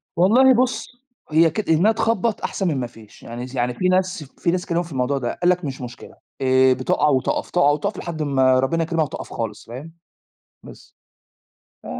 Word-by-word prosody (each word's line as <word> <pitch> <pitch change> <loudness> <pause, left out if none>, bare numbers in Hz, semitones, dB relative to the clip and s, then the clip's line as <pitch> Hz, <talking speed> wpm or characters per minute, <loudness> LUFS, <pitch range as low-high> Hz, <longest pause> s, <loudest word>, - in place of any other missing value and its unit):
والله 245 +10 +5
بُص، 250 +1 0 0.4
هي 165 +2 +5
كد 180 +3 -4
إنها 170 +7 +4
تخبّط 225 0 0
أحسن 195 - -2
من 150 -5 0
ما 125 - -3
فيش، 110 -3 -17
يعني 120 +2 -7
س 130 - -11
يعني 125 0 0
في 185 +9 -1
ناس 185 -2 0
في 160 +4 -3
ناس 180 0 -1
اتكلموا 175 -2 -1
في 170 - -13
الموضوع 135 +1 -1
ده، 120 -3 -2
قال 175 - +3
لك: 180 -2 +1
"مش 135 -1 -5
مشكلة 125 -1 -10 0.3
آه، 130 0 +4
بتُقع 130 +3 0
وتُقف، 130 -2 0
تُقع 175 -5 +3
وتُقف 145 0 -2
لحد 165 -2 -5
أما 130 -3 +3
ربنا 165 +6 0
يكرمها 165 -1 0
وتُقف 140 - -8
خالص." 110 -3 -5
فاهم؟ 135 +8 -9 0.7
بس. - - -15 0.9
ف - - -17
155 Hz, 195 wpm, -21 LUFS, 130-180 Hz, 0.9 s, والله